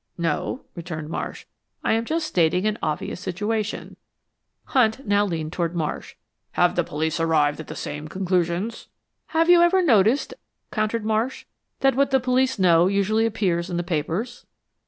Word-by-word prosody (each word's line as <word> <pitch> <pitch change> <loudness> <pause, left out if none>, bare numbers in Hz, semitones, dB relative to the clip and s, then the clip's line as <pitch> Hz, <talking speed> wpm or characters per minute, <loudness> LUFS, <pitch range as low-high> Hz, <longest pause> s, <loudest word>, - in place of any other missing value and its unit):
"No," 170 - -2
returned 160 -3 -6
Marsh, - - -5 0.4
"I - - +2
am 225 +1 0
just 320 +4 -1
stating 180 - +2
an 215 0 0
obvious 155 +2 -3
situation." 210 +4 -3 0.7
Hunt 250 0 +1
now 205 0 +3
leaned 160 -3 -3
toward 170 -1 -2
Marsh. 160 -3 -3 0.4
"Have 175 0 +3
the 175 - +2
police 160 +2 -2
arrived 155 -3 +2
at 160 - -7
the - - -7
same 150 +1 -5
conclusions?" 185 +4 -1 0.4
"Have 325 +1 +2
you 350 -1 +7
ever 365 +2 +4
noticed," 230 - +3 0.4
countered 215 0 -1
Marsh, 220 +4 -1 0.4
"that 270 0 +4
what 275 +2 +2
the 265 -1 +3
police 260 +1 +1
know 175 -2 +5
usually 205 +3 +2
appears 185 -6 -1
in 175 - -2
the 175 - -1
papers?" 175 +8 -3
195 Hz, 155 wpm, -24 LUFS, 170-230 Hz, 0.7 s, you